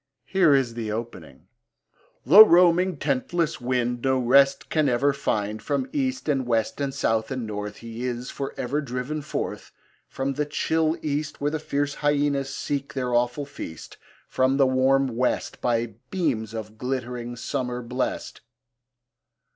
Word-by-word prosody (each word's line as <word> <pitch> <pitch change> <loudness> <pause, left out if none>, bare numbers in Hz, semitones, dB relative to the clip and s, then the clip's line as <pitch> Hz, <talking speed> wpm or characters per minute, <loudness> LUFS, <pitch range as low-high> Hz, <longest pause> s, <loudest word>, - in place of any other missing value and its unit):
Here 175 -7 +4
is 130 -4 +1
the 115 -2 -4
opening: 110 -7 -7 0.8
The 190 - +11
roaming, 180 -2 +4
tentless 150 +3 -1
wind 120 -1 -1
No 130 -1 +2
rest 135 +2 +4
can 155 -3 +2
ever 135 +3 +2
find 110 -5 -2
From 265 - -1
east, 265 - -1
and 135 -4 0
west, 115 +3 0
and 140 -1 -1
south, 110 -4 0
and 130 -3 -3
north 105 -1 -5
He 115 +2 -4
is 125 0 -4
for 135 -1 -5
ever 140 +4 -1
driven 130 +3 -4
forth! - - -5 0.4
From 135 +1 -3
the 150 +1 -2
chill 160 +2 0
east 150 0 -2
Where 145 +1 0
fierce 145 -1 -2
hyaenas 145 -2 +1
seek 140 0 -4
their 125 -2 -1
awful 120 +4 +1
feast: 80 - -9 0.3
From 130 +1 +1
the 140 - +5
warm 130 +1 +3
west, 125 +1 -1
By 115 -2 0 0.2
beams 120 - -1
of 110 -1 -7
glitt'ring 125 -2 -4
summer 125 +1 -3
blest. 125 +2 -3
130 Hz, 145 wpm, -25 LUFS, 120-145 Hz, 0.8 s, The